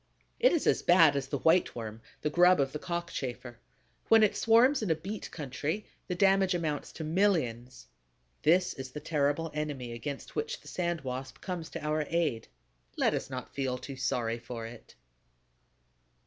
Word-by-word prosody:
It - - +5
is 335 - +1
as - - +3
bad 165 -5 +6
as 135 -1 -2
the 140 - -2
White 165 +6 +3
Worm, 110 -1 -6 0.2
the 150 - -1
grub 180 +2 +5
of 135 -1 +1
the 150 - -5
Cockchafer. 135 -9 -5 0.5
When 225 -1 +6
it 210 - +3
swarms 240 +5 +4
in 210 - -2
a 160 - +3
beet 195 +7 -6
country, 150 +7 -4 0.2
the 180 - -2
damage 195 -1 +4
amounts 155 -4 -2
to 160 - -6
millions. 155 - 0 0.6
This 175 +4 +3
is 130 -2 -7
the 150 - -7
terrible 150 +1 0
enemy 145 -5 -3
against 135 +4 -6
which 455 +3 -2
the - - -16
Sand 175 -2 -2
Wasp 130 0 -6
comes 180 -4 -5
to 165 -3 -6
our 150 0 0
aid. 155 -9 0 0.5
Let - - +2
us - - -3
not 130 -2 -6
feel 130 -2 -1
too 135 +2 -8
sorry 120 -2 -1
for 115 -1 -7
it! 115 0 -12
150 Hz, 175 wpm, -30 LUFS, 130-180 Hz, 0.6 s, bad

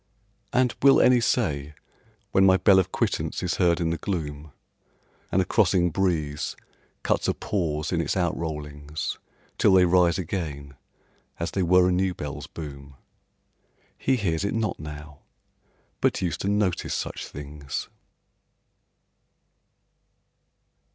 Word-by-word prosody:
And 125 -1 +2
will 135 0 +7
any 125 -1 +5
say 75 - 0 0.6
when 95 - +4
my 95 -1 +6
bell 95 +1 +5
of 95 0 -1
quittance - - -1
is - - -1
heard 85 -2 +3
in 85 -1 0
the 85 - -3
gloom, 75 -5 -4 0.8
And 95 - +3
a - - -8
crossing 90 -3 +2
breeze 80 -6 -1 0.5
cuts - - +1
a - - +1
pause 75 -6 -2
in 85 -2 +1
its 75 - -1
outrollings, 75 -4 -3 0.4
Till - - +5
they 90 -1 +6
rise 90 -1 +4
again, 75 -6 -4 0.7
as 85 - -2
they 95 - -1
were 90 +1 +5
a - - +2
new 90 0 +1
bell's 75 -1 -6
boom, 70 -3 -9 1.0
"He 135 - +1
hears 90 -7 -1
it 100 - -1
not 110 -2 -1
now, 75 -1 -9 0.8
but - - +1
used 85 -4 -2
to 100 - -1
notice 100 -3 0
such - - -4
things"? 70 -1 -6
85 Hz, 130 wpm, -25 LUFS, 75-95 Hz, 1.0 s, will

